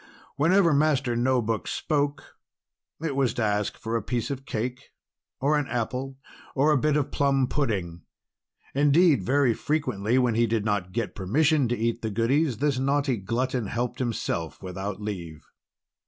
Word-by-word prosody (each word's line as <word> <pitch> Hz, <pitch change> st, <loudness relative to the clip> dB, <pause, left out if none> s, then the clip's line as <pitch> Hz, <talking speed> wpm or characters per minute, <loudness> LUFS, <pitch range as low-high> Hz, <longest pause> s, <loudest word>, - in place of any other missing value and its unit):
Whenever 170 Hz, +3 st, +4 dB
Master 140 Hz, -4 st, +2 dB
No 125 Hz, +1 st, +2 dB
Book 110 Hz, 0 st, -2 dB
spoke, 145 Hz, -2 st, -2 dB, 0.7 s
it 150 Hz, -4 st, -1 dB
was 135 Hz, -3 st, +1 dB
to 120 Hz, -, 0 dB
ask 105 Hz, -1 st, 0 dB
for 115 Hz, +1 st, -4 dB
a 115 Hz, -, +1 dB
piece 120 Hz, +1 st, -2 dB
of 135 Hz, -1 st, -6 dB
cake, 125 Hz, +4 st, -4 dB, 0.5 s
or 145 Hz, +3 st, +2 dB
an 145 Hz, -, -3 dB
apple, 130 Hz, +3 st, -3 dB, 0.4 s
or 145 Hz, +3 st, +3 dB
a 150 Hz, -, +4 dB
bit 150 Hz, +2 st, +2 dB
of 145 Hz, -, -1 dB
plum 135 Hz, -2 st, +2 dB
pudding. 100 Hz, -, -2 dB, 0.7 s
Indeed, 145 Hz, +3 st, +4 dB
very 135 Hz, -2 st, +2 dB
frequently 125 Hz, -6 st, 0 dB
when 125 Hz, -3 st, +3 dB
he 115 Hz, +1 st, +2 dB
did 110 Hz, -1 st, -1 dB
not 100 Hz, -4 st, -1 dB
get 115 Hz, +1 st, -2 dB
permission 140 Hz, -, +2 dB
to 120 Hz, +1 st, -1 dB
eat 115 Hz, +1 st, -1 dB
the 110 Hz, -, -2 dB
goodies, 120 Hz, +5 st, +1 dB
this 140 Hz, 0 st, 0 dB
naughty 140 Hz, -1 st, +1 dB
glutton 120 Hz, +3 st, -2 dB
helped 120 Hz, +3 st, -3 dB
himself 110 Hz, -9 st, -2 dB
without 95 Hz, +2 st, -5 dB
leave. 90 Hz, -7 st, -6 dB
125 Hz, 160 wpm, -26 LUFS, 110-140 Hz, 0.7 s, Whenever